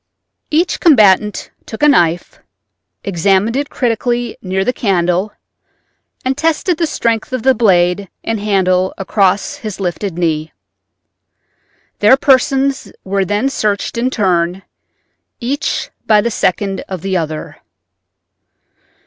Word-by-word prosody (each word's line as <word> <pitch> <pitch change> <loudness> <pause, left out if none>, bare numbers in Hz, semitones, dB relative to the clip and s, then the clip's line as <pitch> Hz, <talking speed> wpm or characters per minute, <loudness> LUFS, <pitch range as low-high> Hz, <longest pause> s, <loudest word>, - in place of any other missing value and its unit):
Each 335 +4 +1
combatant 210 - +3 0.2
took 220 - -6
a - - +7
knife, 175 - +1 0.6
examined 195 +4 +1
it 280 +1 -1
critically 240 0 -1
near 190 0 -2
the 250 - +1
candle 185 -2 0 0.9
and 260 +1 0
tested 325 +3 0
the 335 - +1
strength 230 -5 -1
of 255 -3 -3
the 265 - +5
blade 190 -4 +2
and 225 -1 -2
handle 190 -3 +1
across 195 +5 0
his 215 -8 -7
lifted 185 -1 -3
knee. 160 -3 -1 1.5
Their 215 +6 +6
persons 270 0 +2
were 195 0 -1
then 205 +7 0
searched 215 -7 -1
in 240 +2 0
turn, 185 -5 0 0.8
each 275 +5 -2 0.2
by 215 -1 +5
the 235 +3 0
second 195 0 -1
of 185 -4 -6
the 195 -1 -1
other. 155 -3 -4
205 Hz, 120 wpm, -15 LUFS, 185-250 Hz, 1.5 s, a